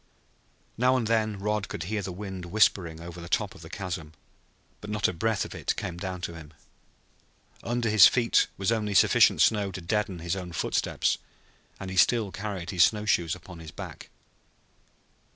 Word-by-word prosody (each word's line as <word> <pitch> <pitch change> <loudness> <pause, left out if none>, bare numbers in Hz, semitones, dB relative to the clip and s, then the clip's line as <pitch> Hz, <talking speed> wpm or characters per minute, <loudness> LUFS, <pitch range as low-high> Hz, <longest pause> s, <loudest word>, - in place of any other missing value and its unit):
Now 130 +1 +4
and 120 - -1
then 110 -2 +1
Rod 105 +1 -1
could 85 - -5
hear 105 +4 -2
the 95 - -5
wind 95 -1 -7
whispering 90 -4 +2
over 85 +1 -9
the 85 - -9
top - - 0
of - - -14
the 80 - -11
chasm. 85 -5 -5 0.7
But 105 - -9
not 105 -1 +1
a - - -2
breath 105 +4 0
of - - -9
it - - -2
came 85 - -5
down 95 -1 -5
to 85 - -4
him. 80 -2 -12 1.1
Under 120 0 -1
his 105 -3 +8
feet 120 -2 +3
was 95 +2 0
only 105 -3 -1
sufficient - - +5
snow 105 -2 +2
to 95 - -6
deaden 100 +1 -1
his 85 +2 -3
own 90 -2 -6
footsteps, - - 0 0.6
and 95 -1 -6
he 95 - -5
still 110 0 +3
carried 95 -4 -5
his 90 -2 +5
snow 105 -1 -1
shoes 85 -4 +1
upon 90 -1 -12
his 80 -1 -9
back. - - -9
95 Hz, 185 wpm, -27 LUFS, 85-105 Hz, 1.1 s, his